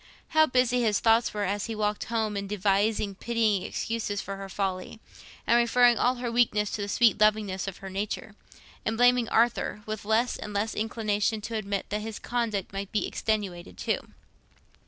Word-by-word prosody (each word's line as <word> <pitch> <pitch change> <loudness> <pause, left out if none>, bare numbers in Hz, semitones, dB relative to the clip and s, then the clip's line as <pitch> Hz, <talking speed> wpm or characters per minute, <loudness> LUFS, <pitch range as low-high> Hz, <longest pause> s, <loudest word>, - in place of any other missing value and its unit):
How 315 0 +5
busy 250 -1 +2
his 215 -4 +2
thoughts 225 +1 +3
were, 210 -1 -2
as 200 +2 -1
he 225 - -4
walked 210 -1 -1
home, 220 -2 -1
in 200 0 -3
devising 205 +1 +1
pitying 220 -1 0
excuses 215 0 -3
for 195 - -5
her 195 0 -7
folly, 190 +1 -3 0.5
in 235 - +5
referring 240 0 +4
all 250 +1 +3
her 240 -1 -3
weakness 215 -3 +2
to 210 - -3
the 200 - -2
sweet 225 0 +3
lovingness 210 -3 +2
of 195 - -5
her - - -5
nature, 205 +2 -4 0.5
in 220 - -1
blaming 245 -1 +4
Arthur, 230 -2 +1
with 215 -1 -5
less 220 +4 +1
and 210 -1 -7
less 210 +2 -1
inclination 215 -1 -1
to 225 +2 -5
admit 200 -2 -2
that 210 +1 -2
his 220 0 -5
conduct 225 -6 -2
might 195 0 -5
be 215 - 0
extenuated 195 -5 -3
too! - - 0
215 Hz, 180 wpm, -27 LUFS, 200-230 Hz, 0.5 s, How